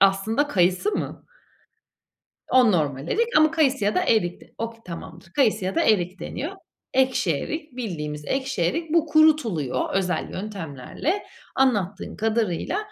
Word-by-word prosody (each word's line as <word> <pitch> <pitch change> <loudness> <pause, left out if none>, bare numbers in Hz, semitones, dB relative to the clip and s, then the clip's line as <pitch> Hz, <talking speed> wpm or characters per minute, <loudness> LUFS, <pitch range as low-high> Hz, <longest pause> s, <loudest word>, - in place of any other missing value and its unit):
aslında 195 +9 +3
kayısı 185 - +2
mı? - - -4 1.3
O 250 -5 +5
normal 145 -3 -1
erik 470 +3 +1
ama 310 0 +6
kayısı 280 -8 +2
ya 205 - +1
da - - +3
erik 180 -6 +1
de - - -19
Oke 230 0 -4
tamamdır 170 0 -9
kayısı 220 -8 +2
ya 190 - -2
da 335 - +2
erik 185 - +2
deniyor. 310 +8 -4 0.4
Ekşi 255 - +2
erik, 300 - -5
bildiğimiz 150 -10 -4
ekşi 265 -8 -1
erik. 310 - -1
Bu 330 -1 +4
kurutuluyor 295 - +2
özel 185 -2 0
yöntemlerle 195 - -4 0.3
anlattığın 205 -7 +1
kadarıyla. 220 - 0
215 Hz, 140 wpm, -24 LUFS, 175-280 Hz, 1.3 s, ama